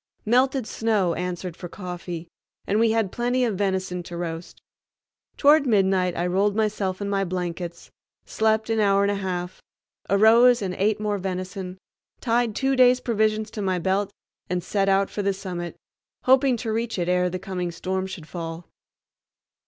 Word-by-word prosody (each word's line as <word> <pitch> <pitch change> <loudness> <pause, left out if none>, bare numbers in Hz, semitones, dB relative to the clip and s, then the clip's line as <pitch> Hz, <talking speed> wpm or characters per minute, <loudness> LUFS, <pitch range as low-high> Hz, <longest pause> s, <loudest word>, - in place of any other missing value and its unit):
Melted 255 +2 +2
snow 215 -7 0
answered 180 0 -4
for 175 - -8
coffee, 175 -2 -6 0.4
and 210 - +1
we 230 0 +4
had 220 -4 +1
plenty 245 +1 +1
of 225 - 0
venison 190 -2 -1
to 170 0 -8
roast. 165 0 -6 0.8
Toward 290 -1 +5
midnight 190 -5 +2
I 175 - 0
rolled 195 +3 +1
myself 205 -3 -1
in - - -3
my 200 -1 0
blankets, 175 -1 -5 0.3
slept 220 0 +1
an 225 - +1
hour 200 -1 +3
and 200 - +2
a 200 -1 -3
half, 180 -1 -4 0.5
arose 225 +4 +6
and 185 -2 -2
ate 210 +3 +1
more 210 -1 -1
venison, 185 0 -5 0.4
tied 235 -2 +1
two 270 0 +1
days' 250 -1 +5
provisions 215 -2 0
to 210 - -5
my 190 -2 0
belt, 190 +3 0 0.4
and 180 0 -1
set 195 -1 0
out 195 0 +2
for 205 - -3
the 200 0 +1
summit, 180 -3 -6 0.5
hoping 260 -1 +4
to 225 -1 -3
reach 230 0 -2
it 175 -1 -1
ere 180 0 +2
the 185 - -3
coming 180 -1 -4
storm 185 +3 -3
should 180 -5 -8
fall. 165 -1 -6
195 Hz, 170 wpm, -24 LUFS, 180-220 Hz, 0.8 s, arose